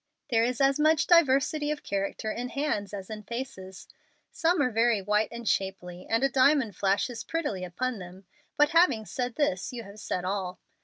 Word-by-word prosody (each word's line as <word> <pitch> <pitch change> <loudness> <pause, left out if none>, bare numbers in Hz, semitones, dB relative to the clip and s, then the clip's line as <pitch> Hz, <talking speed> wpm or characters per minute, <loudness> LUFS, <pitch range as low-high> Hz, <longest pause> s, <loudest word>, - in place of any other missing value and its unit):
There 225 -1 +4
is 245 0 -1
as 275 +1 +3
much 310 0 +4
diversity 295 -2 +3
of 300 -1 -3
character 200 +2 -2
in 245 +2 -4
hands 250 -8 -2
as 195 -2 -7
in 215 -1 -6
faces. 210 -5 -7 0.4
Some 345 +2 +1
are 255 -3 +2
very 230 -1 +3
white 210 +2 +1
and 235 -1 -7
shapely, 185 -2 -2
and 225 +3 +1
a - - +5
diamond 265 -4 +3
flashes 205 +4 0
prettily 290 - -3
upon 225 +6 -3
them, 185 +1 -11 0.3
but 295 0 +5
having 300 -10 +3
said 245 +2 -3
this 240 -12 0
you 240 -2 -6
have 200 +1 -12
said 180 -3 -3
all. 185 -1 -3
230 Hz, 185 wpm, -28 LUFS, 195-275 Hz, 0.4 s, a